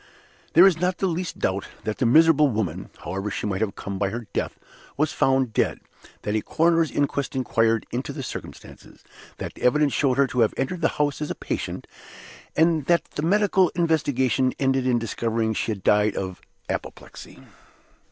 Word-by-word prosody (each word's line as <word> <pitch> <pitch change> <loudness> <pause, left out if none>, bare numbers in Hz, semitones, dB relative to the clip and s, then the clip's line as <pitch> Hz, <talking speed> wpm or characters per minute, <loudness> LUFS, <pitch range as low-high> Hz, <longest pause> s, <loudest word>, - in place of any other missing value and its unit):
There 175 +3 +8
is 180 -5 +4
not 180 0 +1
the - - -1
least 175 -1 -2
doubt 95 +1 -1 0.2
that 110 0 -3
the 125 - +2
miserable 155 +3 +6
woman 95 -6 -3
(however 95 +5 -3
she 105 - -4
might 100 -1 -2
have 110 -3 -1
come 100 -1 -6
by 100 - +1
her 115 +3 -5
death) - - -2 0.4
was 150 +1 +1
found 130 -3 +2
dead - - 0 0.4
that 105 - -2
a 110 - +1
coroner's 165 +2 +2
inquest 140 -2 -1
inquired 115 -3 +1
into - - -3
the - - -6
circumstances - - -10 0.3
that - - -6
the - - -16
evidence 145 +3 +3
showed 135 -3 +1
her 140 - +5
to 125 -1 -3
have 115 -2 +3
entered 165 +7 -2
the - - +4
house 145 0 0
as 150 - -3
a - - -3
patient - - -4 0.7
and 160 -2 +2
that 170 -1 +3
the - - -4
medical 190 +1 +3
investigation 135 -7 +1
ended 135 -1 +1
in 125 -2 +3
discovering 115 0 -1
that 110 - -2
she - - -1
had 100 -4 -5
died 105 0 +3
of 95 -2 -4 0.3
apoplexy. - - -7
130 Hz, 185 wpm, -24 LUFS, 110-160 Hz, 0.7 s, There